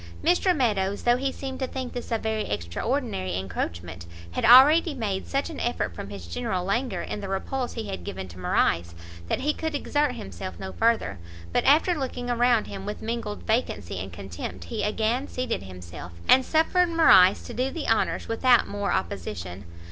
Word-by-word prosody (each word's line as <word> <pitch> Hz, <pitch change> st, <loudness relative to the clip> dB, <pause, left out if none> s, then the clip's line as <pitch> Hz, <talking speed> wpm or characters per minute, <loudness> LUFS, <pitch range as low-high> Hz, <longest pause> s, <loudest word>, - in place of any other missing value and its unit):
Mr 355 Hz, +1 st, +3 dB
Meadows, 200 Hz, -6 st, 0 dB
though 240 Hz, 0 st, +4 dB
he 270 Hz, +1 st, -1 dB
seemed 265 Hz, -1 st, -6 dB
to 260 Hz, -, -1 dB
think 260 Hz, -1 st, -5 dB
this 245 Hz, -, -6 dB
a 230 Hz, -, +2 dB
very 220 Hz, 0 st, -2 dB
extraordinary 185 Hz, -, -2 dB
encroachment, 85 Hz, -2 st, -5 dB, 0.2 s
had -, -, -3 dB
already 290 Hz, +6 st, +7 dB
made 205 Hz, -6 st, -3 dB
such 275 Hz, +1 st, -1 dB
an 315 Hz, -, -7 dB
effort 240 Hz, -, -1 dB
from 90 Hz, -, -7 dB
his 100 Hz, -4 st, -8 dB
general 180 Hz, -, -2 dB
languor 200 Hz, -2 st, -1 dB
in -, -, -5 dB
the 195 Hz, -, -5 dB
repulse 245 Hz, +6 st, -2 dB
he 225 Hz, -, -4 dB
had 90 Hz, -, -5 dB
given 95 Hz, +2 st, -6 dB
to 90 Hz, 0 st, -12 dB
Morrice, 85 Hz, -1 st, +1 dB, 0.3 s
that -, -, -1 dB
he 300 Hz, +3 st, +1 dB
could 320 Hz, -1 st, -3 dB
exert 290 Hz, -1 st, 0 dB
himself 95 Hz, -1 st, -7 dB
no 95 Hz, -, -5 dB
further; 225 Hz, -, +1 dB, 0.3 s
but -, -, +2 dB
after 310 Hz, +6 st, +5 dB
looking 250 Hz, -5 st, -3 dB
around 240 Hz, -1 st, +3 dB
him 195 Hz, -1 st, -7 dB
with 210 Hz, -, -5 dB
mingled 225 Hz, -2 st, -4 dB
vacancy 220 Hz, -, -1 dB
and 95 Hz, +1 st, -6 dB
contempt, 90 Hz, 0 st, -7 dB
he 85 Hz, -, -4 dB
again 225 Hz, +5 st, 0 dB
seated 255 Hz, -2 st, -3 dB
himself, 90 Hz, -2 st, -9 dB
and 260 Hz, -, +7 dB
suffered 330 Hz, +5 st, +2 dB
Morrice 195 Hz, -, +6 dB
to -, -, -8 dB
do 255 Hz, +2 st, 0 dB
the 305 Hz, +2 st, -5 dB
honours 225 Hz, -, +1 dB
without 240 Hz, +1 st, +4 dB
more 205 Hz, 0 st, -2 dB
opposition. 90 Hz, 0 st, -4 dB
220 Hz, 185 wpm, -26 LUFS, -, 0.3 s, already